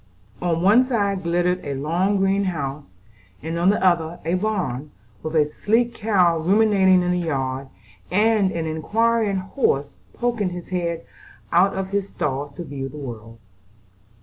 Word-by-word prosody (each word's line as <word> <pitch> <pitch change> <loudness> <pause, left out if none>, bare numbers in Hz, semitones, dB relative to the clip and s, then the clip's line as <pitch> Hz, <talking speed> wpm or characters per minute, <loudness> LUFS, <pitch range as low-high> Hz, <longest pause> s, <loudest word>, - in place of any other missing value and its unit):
On 170 -1 0
one 215 +7 +6
side 200 -7 0
glittered 175 +1 0
a 140 -1 -3
long 175 +8 0
green 195 +1 +2
house, 145 -5 -3 0.6
and 165 +2 -3
on 175 +2 +4
the 200 -1 +2
other 170 -2 +2
stood 165 +3 -1
a - - +2
barn, 160 - -2 0.3
with 155 +1 -5
a 150 -2 +4
sleek 230 +9 0
cow 190 -7 +2
ruminating 190 0 +4
in 180 - 0
the 180 - +1
yard, 135 -5 -2 0.4
and 210 -1 +3
an 165 -2 -3
inquiring 215 +6 +1
horse 185 - 0 0.3
poking 235 -5 0
his 175 -1 -8
head 170 -2 -2 0.5
out 185 +3 +4
of 190 0 -3
his 200 0 -2
stall 140 0 -2
to 175 - -4
view 135 -3 -5
the 150 - -10
world. 115 -5 -8
180 Hz, 160 wpm, -22 LUFS, 155-200 Hz, 0.6 s, one